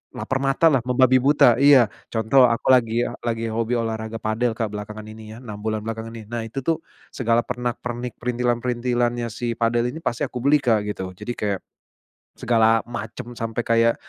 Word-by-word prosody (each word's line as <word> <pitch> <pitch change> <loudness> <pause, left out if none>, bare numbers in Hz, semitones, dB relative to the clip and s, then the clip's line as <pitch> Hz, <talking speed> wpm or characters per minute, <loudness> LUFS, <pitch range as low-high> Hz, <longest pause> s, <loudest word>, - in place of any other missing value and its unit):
laper 130 - -2
matalah 135 +2 +3
membabi 130 0 +4
buta 130 -3 +4
iya, 135 -6 +6 0.2
contoh 120 +3 +4
aku 115 -1 -2
lagi 120 -1 +3 0.2
lagi 115 -1 -2
hobi 115 +2 -1
olahraga 110 -1 -3
padel 110 +1 -1
Kak 110 -3 -2
belakangan 105 +1 -7
ini 110 0 -10
ya - - -11
6 105 -3 -8
bulan 110 0 -3
belakangan 115 0 -5
ini 110 - -8
nah 120 - -2
itu 120 +4 -6
tuh 165 +3 0 0.3
segala 115 -2 +1
pernak-pernik 125 -1 -4
perintilan-perintilannya 120 0 -1
si 115 +1 -4
padel 120 +1 +1
ini 160 - -7
pasti 120 -7 -2
aku 125 - -4
beli 140 +4 +4
Kak 110 -4 +2
gitu. 95 -2 -4
Jadi 120 +6 -6
kayak, 100 -2 -2 0.8
segala 115 -1 +3
macem 120 +1 -7
sampai 115 0 -3
kayak, 115 0 +3
115 Hz, 170 wpm, -23 LUFS, 110-125 Hz, 0.8 s, iya